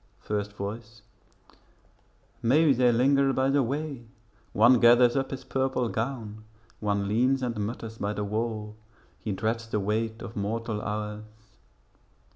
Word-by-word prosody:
First 105 -1 -3
Voice 110 +2 -7 1.4
Maybe 140 +5 +4
they 125 -1 +4
linger 135 +3 +3
by 130 +1 +2
the 140 0 +3
way; 135 -1 -3 0.4
One 120 +4 +5
gathers 120 +1 +6
up 135 -1 0
his 135 - -6
purple 130 -2 -1
gown; 110 -3 -4 0.4
One 100 -1 -1
leans 130 +5 +2
and 120 -2 -1
mutters 110 +1 -5
by 100 +1 -1
the 105 - -3
wall; 105 0 -3 0.4
He 110 - -4
dreads 110 +3 -2
the 105 - -1
weight 110 +3 -2
of 110 - -8
mortal 110 +1 -2
hours. 105 0 -4
115 Hz, 135 wpm, -27 LUFS, 105-125 Hz, 1.4 s, gathers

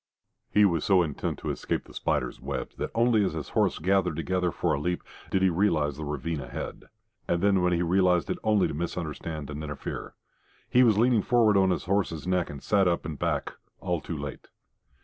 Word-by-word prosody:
He 105 0 +5
was 85 -6 +1
so 95 -3 +4
intent 75 -4 -3
to - - -3
escape - - -2
the - - -16
spiders' - - -2
webs - - -5
that - - -3
only 115 -2 +4
as 95 - 0
his 80 -4 -5
horse - - +1
gathered 90 -1 +1
together 90 +2 0
for - - 0
a - - 0
leap 90 +4 -2 0.3
did 95 - +1
he 95 - +5
realise 75 -6 +1
the 80 - -5
ravine 75 +1 -3
ahead. 60 - -7 0.4
And 85 +1 0
then 100 -1 +4 0.2
he 85 0 +1
realised 90 0 +3
it - - -3
only 105 -3 +3
to - - -5
misunderstand 80 -2 -4
and 75 +1 -5
interfere. 75 -2 -6 0.5
He 125 - +4
was 115 -5 +5
leaning 120 -1 +4
forward 115 -2 +3
on 95 -1 +4
his 90 -4 -1
horse's 95 -5 -1
neck 90 -1 0
and 70 -2 -8
sat 100 -3 +3
up 85 -1 0
and 75 -2 -5
back - - -1 0.3
all 90 -4 -2
too 80 +2 -5
late. 70 -1 -7
90 Hz, 205 wpm, -27 LUFS, 75-100 Hz, 0.5 s, He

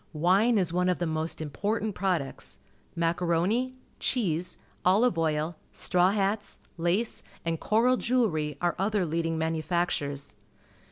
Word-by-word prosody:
Wine 190 +9 +3
is 180 -4 +1
one 180 +1 +2
of 180 - +1
the 175 - -1
most 160 0 -2
important 205 +8 -2
products. 180 -8 -1 0.4
Macaroni, 175 +9 +1 0.2
cheese, 180 -8 -1 0.3
olive 200 +4 +4
oil, 160 0 0
straw 180 0 +2
hats, 205 +1 0 0.2
lace, 175 +7 0 0.2
and 165 -1 -1
coral 240 +4 +3
jewellery 165 - +1
are 175 -1 +1
other 200 -1 +1
leading 165 0 -1
manufactures. 160 -3 -1
175 Hz, 120 wpm, -28 LUFS, 160-205 Hz, 0.4 s, olive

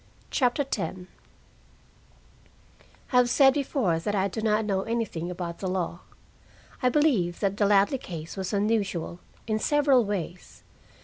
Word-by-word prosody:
CHAPTER 255 +2 +2
X 270 -5 -3 2.3
I 250 - +3
have 250 -1 +5
said 270 +1 +5
before 255 - 0
that 205 +5 -2
I 195 0 +2
do 220 +3 -5
not 215 0 +1
know 195 -2 0
anything 220 -6 -3
about 175 -1 -5
the 190 - -3
law. 180 -2 -2 0.8
I 250 - +3
believe 240 - +2
that 200 -1 0
the 205 - +3
Ladley 205 +6 +3
case 165 -6 -7
was 190 -2 -4
unusual, 200 -5 -1 0.3
in 215 -1 -1
several 280 -2 +3
ways. 185 -4 -5
205 Hz, 140 wpm, -27 LUFS, 180-245 Hz, 2.3 s, have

